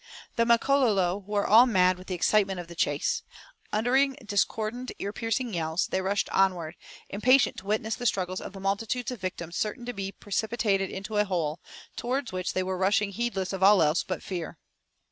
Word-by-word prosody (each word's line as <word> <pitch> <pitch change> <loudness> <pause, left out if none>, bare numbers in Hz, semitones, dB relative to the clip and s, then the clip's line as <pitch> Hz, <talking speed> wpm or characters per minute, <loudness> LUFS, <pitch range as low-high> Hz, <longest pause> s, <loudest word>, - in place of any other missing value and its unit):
The 230 -1 +2
Makololo 230 -7 +3
were 205 -1 0
all 230 +5 +7
mad 185 -4 +3
with 185 - -13
the 185 - -2
excitement 195 +1 +2
of 175 - -7
the 170 - -10
chase. 145 -3 0 0.5
Uttering 260 +5 +2
discordant 220 +4 -1
ear 200 +1 -4
piercing 230 +1 -2
yells, 160 0 0
they 190 - -1
rushed 200 +2 0
onward, 175 -4 +1 0.3
impatient 255 +6 +3
to 190 - -9
witness 215 +1 0
the 245 +2 -2
struggles 185 -2 -1
of - - -8
the 195 - -9
multitudes 210 +6 -2
of 245 - -7
victims 175 -2 -5
certain 240 +3 -2
to 245 - -4
be 195 -2 -4
precipitated 205 -1 -1
into 195 +3 -5
a 210 - +3
hole, 170 -5 -2 0.4
towards 250 +1 -2
which 185 0 -3
they 185 - 0
were 185 0 -3
rushing 200 +1 +2
heedless 200 -4 -2
of 190 - -4
all 200 +1 +7
else 155 +3 +2
but 185 - -5
fear. 175 -4 -5
200 Hz, 185 wpm, -27 LUFS, 185-225 Hz, 0.5 s, all